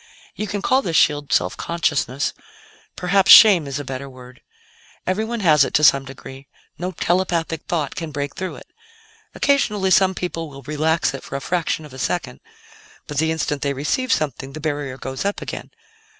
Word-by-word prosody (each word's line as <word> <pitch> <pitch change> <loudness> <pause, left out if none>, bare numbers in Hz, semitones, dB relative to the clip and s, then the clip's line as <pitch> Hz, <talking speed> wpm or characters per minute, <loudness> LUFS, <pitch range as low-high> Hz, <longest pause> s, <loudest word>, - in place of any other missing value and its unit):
"You 215 - -4
can 205 0 -4
call 260 +1 +3
this 170 -10 -3
shield 145 -2 +2
'self 90 +1 +1
consciousness' 145 -5 -1 0.6
perhaps 190 +1 +3
shame 190 -9 +9
is 140 0 -3
a - - -4
better 135 0 -6
word. 125 -1 -14 0.6
Everyone 220 +5 -2
has 155 -6 +5
it, - - -3
to 150 - +3
some 140 -2 +5
degree; 135 0 -11 0.3
no 180 +2 -3
telepathic 170 -2 -1
thought 155 -5 -1
can 165 -2 -5
break 145 -1 -4
through 185 0 -5
it. - - -13 0.7
Occasionally, 210 -9 +1
some 190 -1 +4
people 165 -3 -4
will 140 -1 -12
relax 155 +3 0
it 135 - -6
for - - -8
a - - -1
fraction 165 0 -2
of 145 - -13
a 130 - -9
second, 175 +7 -3 0.7
but 150 -2 -3
the 160 +1 +1
instant 150 -3 -2
they 140 -1 0
receive 150 - -1
something, 140 -2 -1
the 155 - -7
barrier 145 -4 -3
goes 135 0 -5
up 200 +1 -1
again." - - -7
155 Hz, 180 wpm, -21 LUFS, 140-185 Hz, 0.7 s, shame